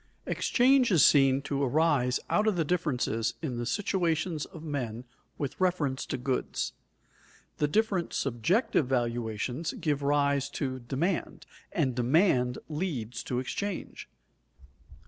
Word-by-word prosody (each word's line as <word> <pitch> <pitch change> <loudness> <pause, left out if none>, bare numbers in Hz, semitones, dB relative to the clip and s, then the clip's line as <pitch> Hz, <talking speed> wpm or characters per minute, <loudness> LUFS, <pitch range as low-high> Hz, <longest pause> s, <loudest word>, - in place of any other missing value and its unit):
Exchange 255 0 +3
is 170 -9 +6
seen 135 -1 +5
to 140 -1 -2
arise 140 -2 +2
out 210 +1 +2
of 215 - +3
the 165 -2 +1
differences 130 -9 0
in 130 -6 -2
the 120 0 -3
situations 170 -5 0
of 160 - -11
men 125 -6 -4 0.3
with 140 +4 -4
reference 155 -8 0
to - - -2
goods. 130 +1 -2 0.8
The 150 - +2
different 195 0 0
subjective 140 - +1
valuations 120 +3 -1
give 145 -3 -1
rise 140 -1 +1
to 130 -3 -2
demand, 145 +9 -2 0.3
and 135 -6 0
demand 125 0 +2
leads 145 - -3
to 125 - -2
exchange. 185 +10 -4
140 Hz, 125 wpm, -29 LUFS, 125-170 Hz, 0.8 s, is